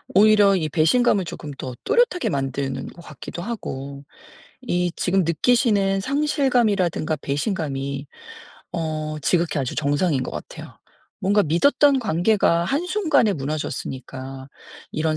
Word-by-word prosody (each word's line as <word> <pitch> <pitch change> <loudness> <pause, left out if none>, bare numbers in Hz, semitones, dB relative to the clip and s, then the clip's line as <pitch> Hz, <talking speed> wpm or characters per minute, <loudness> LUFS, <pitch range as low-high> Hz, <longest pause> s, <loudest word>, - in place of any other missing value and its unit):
오히려 205 -1 +6
이 160 -4 -1
배신감을 190 - +3
쪼금 150 -2 -7
더 130 -2 -6
또렷하게 480 -5 +2
만드는 135 -1 -3
것 170 - -12
같기도 170 +1 -9
하고 140 - -6 0.6
이 180 -7 -1
지금 190 -1 +1
느끼시는 200 - +2
상실감이라든가 240 - +1
배신감이 140 -3 -3 0.7
어 155 -2 -3
지극히 170 0 +1
아주 130 -3 -2
정상인 145 0 +1
것 - - -5
같아요. - - -9 0.4
뭔가 205 +2 +3
믿었던 275 - +3
관계가 175 -3 +2
한순간에 310 - +1
무너졌으니까 135 -3 -5 0.4
이런 155 0 0
170 Hz, 295 characters per minute, -22 LUFS, 145-215 Hz, 0.7 s, 오히려